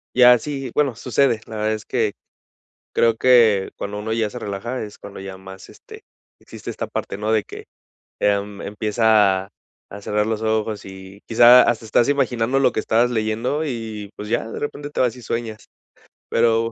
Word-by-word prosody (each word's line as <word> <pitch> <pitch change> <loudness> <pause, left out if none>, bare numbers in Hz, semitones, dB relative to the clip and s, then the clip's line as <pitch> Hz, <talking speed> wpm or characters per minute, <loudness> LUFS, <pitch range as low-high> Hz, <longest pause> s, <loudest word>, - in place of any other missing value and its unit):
Ya, 125 -1 +8
sí, 135 -2 -5
bueno, 140 -6 +1
sucede, 125 -1 +1
la 110 - -8
verdad 110 +1 0
es 110 -1 -6
que 110 -5 0 0.8
creo 115 -1 +3
que 115 -6 +4
cuando 105 +1 -5
uno 110 +1 -3
ya 110 -2 0
se - - -7
relaja 110 +6 -4
es 105 -1 -8
cuando 100 -1 -10
ya 95 -1 -8
más, 95 0 -12
este, - - -14 0.4
existe - - -9
esta - - -5
parte, 100 - -5
¿no? 110 +1 -1
De 110 -2 +2
que, - - -11 0.5
em, 100 0 0
empieza 105 -2 +2
a, - - -21 0.4
a 100 +1 -9
cerrar 105 +1 -1
los 110 0 -2
ojos 110 -2 -1
y 95 +1 -11
quizá 120 +2 +7
hasta 115 -1 0
estás 115 +4 +2
imaginando 130 -2 +1
lo 130 - +3
que - - -1
estabas 120 +3 +2
leyendo, 115 +7 -1
y, 110 -6 -5
pues, 105 +1 -8
ya 115 -1 -1
de - - -6
repente 145 0 -5
te - - -5
vas 125 -1 +2
y 125 - -12
sueñas. 115 -1 -4 0.6
Pero 115 0 +2
110 Hz, 185 wpm, -21 LUFS, 105-120 Hz, 0.8 s, Ya